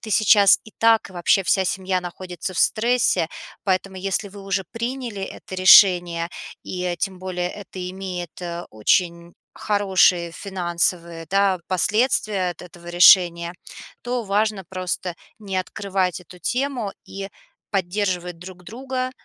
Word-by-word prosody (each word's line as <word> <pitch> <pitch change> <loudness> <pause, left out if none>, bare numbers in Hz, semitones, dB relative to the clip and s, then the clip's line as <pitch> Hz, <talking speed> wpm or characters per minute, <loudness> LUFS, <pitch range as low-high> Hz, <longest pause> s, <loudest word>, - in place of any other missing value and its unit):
ты 220 - -8
сейчас 205 -1 +6
и - - -20
так, 225 -1 +4
и 190 - -15
вообще 175 +2 +2
вся 190 +1 +2
семья 185 0 -1
находится 180 0 -6
в 180 - -5
стрессе, 235 -5 +2 0.4
поэтому 190 0 -1
если 200 +2 -1
вы 200 +1 -12
уже 195 0 -2
приняли 235 -3 -4
это 190 - -8
решение, 175 -2 +6 0.3
и 180 -1 -3
тем 190 +2 -3
более 180 -1 -3
это 185 -3 -7
имеет, 180 -3 -6
э, 170 0 -5
очень 170 - 0 0.2
хорошие 190 -4 +2
финансовые, 170 -3 -2
да, 195 -1 +2
последствия 200 0 +1
от 175 - -10
этого 175 -1 -14
решения, 175 -1 +5 0.5
то 245 0 -2
важно 205 -1 0
просто 185 -1 -4 0.2
не 195 -3 -5
открывать 185 -1 -2
эту 180 +1 -15
тему 250 -4 -2
и 195 0 -7 0.4
поддерживать 180 -2 -2
друг 180 +1 -11
друга, 255 +4 -4
185 Hz, 135 wpm, -22 LUFS, 175-205 Hz, 0.5 s, сейчас